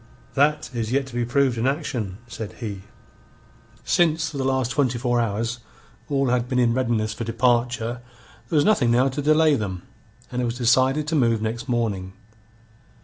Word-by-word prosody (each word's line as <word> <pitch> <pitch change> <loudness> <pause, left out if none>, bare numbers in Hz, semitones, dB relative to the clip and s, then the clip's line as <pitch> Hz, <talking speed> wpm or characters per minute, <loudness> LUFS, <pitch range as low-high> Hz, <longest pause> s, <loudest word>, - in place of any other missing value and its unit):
"That 150 +2 +1
is 115 -2 -3
yet 135 +1 +1
to 135 - -12
be 120 0 -1
proved 125 -1 +1
in 120 - +1
action," 125 - -2
said 110 -3 -7
he. 105 -5 -6 1.0
Since 160 -1 +2
for 140 - -6
the - - 0
last 130 -2 0
twenty 130 -4 +1
four 120 0 +1
hours 115 +2 -2 0.5
all 135 -2 +1
had 125 0 0
been 125 - 0
in 120 -2 +3
readiness 115 -4 0
for 115 - -5
departure, 120 0 0 0.5
there - - -2
was 145 - +4
nothing 150 - +3
now 125 +3 +3
to 135 +3 -3
delay 155 +1 +4
them, 95 -8 -3 0.5
and 125 - -2
it - - 0
was 120 0 -3
decided 130 +4 +3
to 160 - 0
move 115 -6 +3
next 115 +4 -4
morning. 105 -6 -1
125 Hz, 180 wpm, -23 LUFS, 115-135 Hz, 1.0 s, was